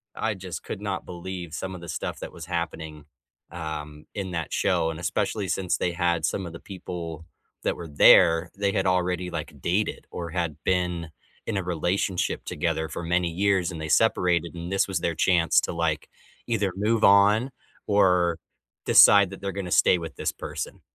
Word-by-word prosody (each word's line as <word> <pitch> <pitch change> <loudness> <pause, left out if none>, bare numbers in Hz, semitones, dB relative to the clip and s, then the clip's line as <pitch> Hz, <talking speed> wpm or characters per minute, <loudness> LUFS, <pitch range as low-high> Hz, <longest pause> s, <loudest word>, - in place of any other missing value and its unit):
I 110 - -1
just 95 -3 -7
could 100 - -6
not 100 -3 -3
believe 90 -2 -7
some 95 +2 -4
of 85 - -9
the 85 - -9
stuff - - -4
that - - -7
was 85 - -8
happening, 80 -3 -4 0.5
um, 75 -2 -6
in 95 -3 -4
that 85 -3 -3
show, 80 - +1
and 80 - -7
especially 100 +2 -1
since 90 0 0
they 90 - 0
had 85 -1 +1
some 95 - -2
of 85 - -7
the 85 - -8
people 85 -4 -7 0.4
that - - 0
were 85 - -7
there, 80 +3 +6
they 100 0 +1
had 95 - 0
already, 90 -1 0
like, - - -6
dated, 95 +5 -1
or 85 -2 -5
had 85 -4 -2
been 90 -3 0 0.4
in 110 - -2
a 95 - -1
relationship 90 +2 -1
together 80 0 -2
for 85 - -5
many 90 +1 +1
years, 95 0 +1
and 85 - -7
they 80 - -4
separated, 85 +1 +2
and 85 +1 -6
this 95 - +2
was 95 -3 -1
their 85 -1 -1
chance 85 0 +3
to, - - -3
like, 80 -2 -1 0.4
either 105 -5 0
move 110 +3 +1
on, 105 +6 +5 0.4
or 90 -4 +3 0.5
decide 100 -2 +7
that 95 - -9
they're 100 - -3
gonna 95 -2 -5
stay 90 - +5
with 80 -1 -7
this - - -1
person. - - -6
90 Hz, 185 wpm, -25 LUFS, 85-95 Hz, 0.5 s, decide